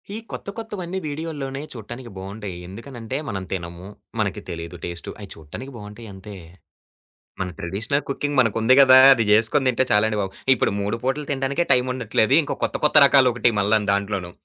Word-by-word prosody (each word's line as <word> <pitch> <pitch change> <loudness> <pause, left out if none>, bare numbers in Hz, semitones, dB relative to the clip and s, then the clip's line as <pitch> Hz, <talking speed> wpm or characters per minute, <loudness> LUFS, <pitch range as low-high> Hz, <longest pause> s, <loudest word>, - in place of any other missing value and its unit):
ఈ - - -4
కొత్త - - -7
కొత్తవన్ని 190 -5 -5
వీడియోల్లోనే 145 -3 -5
చూట్టానికి 120 +2 -9
బాగుండేయి. 100 -1 -7
ఎందుకనంటే, 115 +4 -7
మనం 95 -3 -4
తినము, 85 0 -6 0.3
మనకి - - -1
తెలీదు 85 +1 -6
టేస్టు. 85 -1 -6
అయి 100 -2 -10
చూడటానికి 80 - -10
బాగుంటాయంతే. 105 -2 -10 1.1
మన 95 - -1
ట్రెడిషనల్ 110 +11 -2
కుకింగ్ 145 0 -2
మనకుంది 115 +1 +3
గదా! 130 -1 +8 0.2
అది 115 -3 0
జేసుకొని 110 +6 +3
తింటే 130 +1 +2
చాలండి 105 +1 +2
బాబు. 95 -1 -3 0.2
ఇప్పుడు 120 - 0
3 105 +3 -2
పుటలు 135 +3 -1
తినడానికే 140 +4 0
టైముండట్లేదు. 125 -1 +1
ఇంకో 145 - -4
కొత్త - - -1
కొత్త 150 - +3
రకాలొకటి 125 -3 +4
మల్ల 105 +2 +2
దాంట్లోను. 100 -3 -2
115 Hz, 150 wpm, -22 LUFS, 100-135 Hz, 1.1 s, గదా